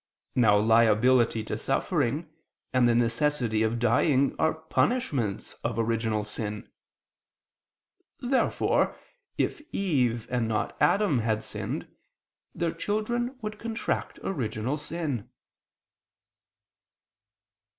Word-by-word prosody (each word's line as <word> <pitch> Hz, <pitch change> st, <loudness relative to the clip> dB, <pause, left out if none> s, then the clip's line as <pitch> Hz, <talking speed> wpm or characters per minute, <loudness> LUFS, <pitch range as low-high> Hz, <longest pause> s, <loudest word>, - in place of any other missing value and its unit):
Now 110 Hz, -5 st, +5 dB
liability 115 Hz, +2 st, +4 dB
to 110 Hz, 0 st, -4 dB
suffering 145 Hz, +2 st, 0 dB, 0.5 s
and 125 Hz, -2 st, +4 dB
the 120 Hz, -, +3 dB
necessity 120 Hz, -1 st, +1 dB
of 110 Hz, +1 st, +1 dB
dying 130 Hz, +4 st, +2 dB
are 160 Hz, 0 st, +2 dB
punishments 160 Hz, -, -1 dB
of 115 Hz, -, -2 dB
original 110 Hz, -2 st, 0 dB
sin. 105 Hz, 0 st, -6 dB, 1.5 s
Therefore 255 Hz, +1 st, +1 dB, 0.4 s
if -, -, -1 dB
Eve, 125 Hz, -, 0 dB
and 120 Hz, -2 st, 0 dB
not 110 Hz, -1 st, -1 dB
Adam, 195 Hz, -, +3 dB
had 110 Hz, -1 st, 0 dB
sinned, -, -, -4 dB, 0.7 s
their 170 Hz, -1 st, 0 dB
children 240 Hz, +5 st, -2 dB
would 215 Hz, 0 st, -5 dB
contract 230 Hz, -1 st, -3 dB
original 120 Hz, -, -2 dB
sin. 150 Hz, -6 st, -4 dB
125 Hz, 95 wpm, -27 LUFS, 110-160 Hz, 1.5 s, Now